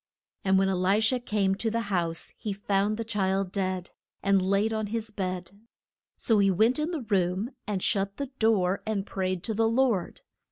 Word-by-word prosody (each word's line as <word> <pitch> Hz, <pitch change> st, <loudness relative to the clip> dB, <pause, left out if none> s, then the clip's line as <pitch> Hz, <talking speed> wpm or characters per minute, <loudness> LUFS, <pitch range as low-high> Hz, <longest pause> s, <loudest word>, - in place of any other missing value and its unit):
And 190 Hz, -1 st, +3 dB
when 195 Hz, 0 st, +3 dB
E -, -, +1 dB
li 185 Hz, +3 st, +2 dB
sha 245 Hz, +3 st, +2 dB
came 210 Hz, -5 st, +1 dB
to 220 Hz, +3 st, -1 dB
the 230 Hz, +1 st, -1 dB
house 170 Hz, -3 st, -1 dB
he 210 Hz, -, -4 dB
found 200 Hz, +1 st, 0 dB
the 230 Hz, -, -2 dB
child 195 Hz, -3 st, 0 dB
dead, 185 Hz, -2 st, -2 dB, 0.3 s
and 195 Hz, -1 st, +4 dB
laid 200 Hz, +4 st, +1 dB
on 220 Hz, -1 st, -1 dB
his 225 Hz, +1 st, -3 dB
bed. 185 Hz, -3 st, -4 dB, 0.6 s
So 225 Hz, -3 st, +2 dB
he 200 Hz, -1 st, +4 dB
went 220 Hz, -, +3 dB
in 305 Hz, +2 st, 0 dB
the 330 Hz, -5 st, -3 dB
room 190 Hz, +4 st, +1 dB, 0.2 s
and 200 Hz, -3 st, -2 dB
shut 195 Hz, -2 st, 0 dB
the 280 Hz, -1 st, -4 dB
door, 200 Hz, -4 st, +2 dB
and 205 Hz, -3 st, -1 dB
prayed 185 Hz, -3 st, -2 dB
to 220 Hz, -, -1 dB
the 225 Hz, +1 st, +2 dB
Lord. 230 Hz, -6 st, +1 dB
200 Hz, 195 wpm, -28 LUFS, 190-220 Hz, 0.6 s, and